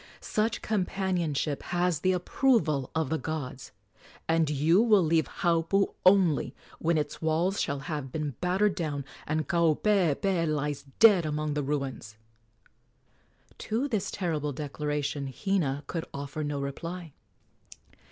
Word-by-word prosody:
Such 220 +2 -1
companionship 180 -8 -1
has 175 -3 0
the 185 +3 +2
approval 180 - +1
of 160 -4 0
the 160 - 0
gods, 140 -4 -5 0.6
and 165 -2 +2
you 155 +7 +3
will 215 -5 +5
leave 160 0 +2
Haupu 175 +2 +1
only 185 -5 +4 0.2
when 165 0 +1
its 150 - -3
walls 165 +5 +1
shall 140 -1 -2
have 145 -5 -4
been 150 -1 -2
battered 190 +3 +2
down 150 -7 -3 0.2
and 155 +1 -1
Kaupeepee 170 +1 +2
lies 150 -2 -2
dead 205 -6 +7
among 150 -1 -2
the 150 - -1
ruins!" 135 -6 -3 1.4
To 235 +6 -1
this 210 -6 -1
terrible 155 -6 -2
declaration 145 -1 -3
Hina 150 -5 -1
could 165 +3 -4
offer 140 +2 -4
no 145 -1 -2
reply. 165 +4 -5
160 Hz, 125 wpm, -28 LUFS, 145-185 Hz, 1.4 s, dead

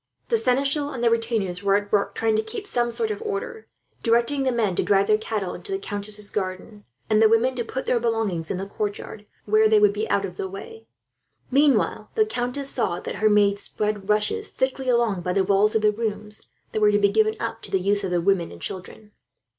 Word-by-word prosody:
The 460 - +3
seneschal 275 +2 +1
and 255 -4 -5
the 235 - +4
retainers 225 -6 -1
were 200 -1 +3
at 205 0 -1
work, 205 -1 +1
trying 225 -1 +1
to 215 - +2
keep 415 - -6
some 240 -10 0
sort 440 - -1
of 425 - -5
order; 445 +1 -5 0.3
directing 235 +5 +2
the 265 -1 +1
men 220 -6 0
to - - +3
drive 200 -1 +3
the 215 +1 +4
cattle 210 -4 -3
into 400 - -8
the 385 - 0
countess's 205 - -4
garden, 195 +1 -5 0.2
and 215 0 +3
the 220 - +6
women 230 +4 +3
to 240 - 0
put 260 +3 -5
down - - +1
their 240 - +2
belongings 200 -8 -2
in 185 - -2
the 190 - -4
courtyard, 205 +1 -5 0.2
where 215 +1 +4
they 215 -1 +5
would 205 -1 +4
be 215 +2 -3
out 200 - +1
of 180 -2 -8
the 190 - -3
way; 445 - -10 0.6
while 280 +1 +2
the 435 - +4
countess 270 - -2
saw 175 -8 -1
that - - -6
her 215 0 +3
maids 205 -1 +3
spread 210 -1 -3
rushes, 215 - +1
thickly, 260 0 -2
along 235 -6 +2
by 180 +1 -2
the 195 - +2
walls 200 +3 +3
of 220 - +2
the 210 - +5
rooms 210 -1 -4 0.2
that 215 - -2
were 210 0 +5
to 205 - +3
be 200 0 +3
given 215 +1 +2
up 230 0 -4
to - - -7
the 190 - +1
use 200 +2 0
of 190 - -2
the 175 -1 +1
women 185 -1 +1
and 85 - -11
children. 195 +3 -7
215 Hz, 235 wpm, -24 LUFS, 200-245 Hz, 0.6 s, the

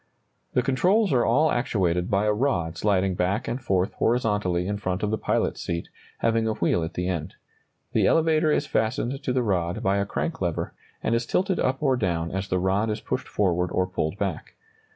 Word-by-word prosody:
] - - -46
The 125 - +3
controls 180 - +2
are 120 -2 +3
all 150 +7 +3
actuated 90 -7 0
by 100 +1 +2
a 105 - +3
rod 105 - 0
sliding 95 0 +1
back 90 +3 -1
and 125 +3 -3
forth 95 -5 0
horizontally 105 -7 +1
in 100 +2 -2
front 95 -1 -3
of 105 - 0
the 110 - +1
pilot's - - 0
seat, 85 0 -3 0.3
having 115 -1 +2
a 110 - +1
wheel 85 0 +1
at 80 +1 -5
the 90 0 -1
end. 90 -1 -3 0.6
The - - +3
elevator 160 -1 +3
is 145 - +1
fastened 120 +3 -1
to 135 - -2
the 125 -1 +1
rod 90 -5 -1
by 95 +1 +2
a 100 0 0
crank 165 +4 -3
lever, 85 -3 -2 0.3
and 115 - +1
is 115 0 0
tilted 190 0 +1
up 130 +3 0
or 135 -3 +3
down 85 -6 -1
as 95 +1 -3
the 90 - 0
rod 95 +4 +1
is 105 - -2
pushed - - -3
forward 90 -3 +1
or 95 - +1
pulled 90 -1 -3
back. 95 -6 -4
105 Hz, 210 wpm, -25 LUFS, 90-125 Hz, 0.6 s, The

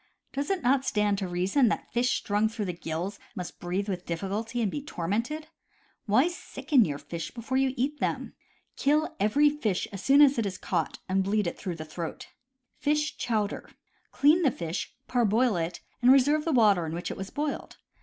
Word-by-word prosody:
Does 280 +1 -2
it 385 -2 -1
not 265 +2 +3
stand 210 -5 +1
to 195 - -2
reason 185 +9 +2
that - - -2
fish 240 +1 +2
strung 210 +1 +1
through 220 -2 -4
the 180 - -2
gills 170 +3 -4 0.2
must 180 -1 -6
breathe 185 +3 -2
with 180 -3 -3
difficulty 205 +7 -3
and 215 -5 +1
be 290 - -3
tormented? 235 - -3 0.6
Why 240 +10 +4
sicken 295 -7 +1
your 145 -3 -3
fish 165 +2 -6
before 240 +2 -3
you 265 -1 +1
eat 280 +5 -1
them? - - -2 0.4
Kill 300 +3 +1
every 285 +9 +4
fish 220 -11 -1
as 195 - -5
soon 280 +2 +7
as 230 -9 +2
caught 170 -4 -2
and 190 +1 +1
bleed 205 +1 +1
it 170 - -2
through 180 -4 -5
the 155 -1 -7
throat. 160 +1 -6 0.5
Fish 300 +1 +1
Chowder. 215 -3 -2 0.2
— - - -40
Clean 305 +5 +4
the 300 - +4
fish, 170 -5 -4
parboil 235 -1 +2
it, 170 0 -3 0.2
and 245 +1 +7
re 270 - +9
serve 295 +3 +1
the 330 - +1
water 205 - +4
in 160 - -4
which 175 - -4
it - - -6
was 195 +1 -5
boiled. 295 0 -4
215 Hz, 195 wpm, -28 LUFS, 185-275 Hz, 0.6 s, re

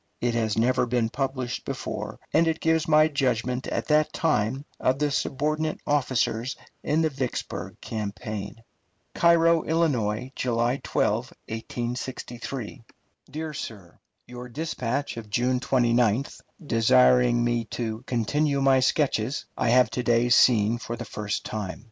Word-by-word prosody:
It 120 -1 0
has 110 -2 0
never 125 +2 +2
been 120 -2 +1
published 130 -3 -3
before, - - -5
and 165 - +4
it 160 0 0
gives 160 0 +1
my 155 0 +6
judgment 125 -3 -1
at - - -2
that 150 0 +3
time 135 -4 0
of 130 +1 +2
the 150 0 0
subordinate 155 +3 -1
officers 130 -3 0 0.3
in 155 +2 +1
the 160 - +2
Vicksburg 130 -3 -4
campaign: 105 0 -5 0.5
CAIRO, 170 -1 +4
ILL., 125 -8 0
July 120 +1 0
12, - - +1 0.4
1863. 120 +2 -5 0.5
DEAR 155 +2 -5
SIR: 100 - -8 0.3
Your 125 0 -9
dispatch 140 -2 -3
of 110 -2 -8
June 125 +4 +1
29th, 120 -1 +1 0.2
desiring 65 - +4
me 120 -1 0
to 110 -2 -4
"continue 140 +5 +1
my 135 -1 +4
sketches," 130 -2 0
I - - 0
have 125 -1 +4
to 125 - -2
day 120 0 +2
seen 115 -2 +4
for 120 0 -5
the 120 +1 -7
first 105 -1 -4
time. 105 -4 -4
125 Hz, 135 wpm, -26 LUFS, 115-140 Hz, 0.5 s, my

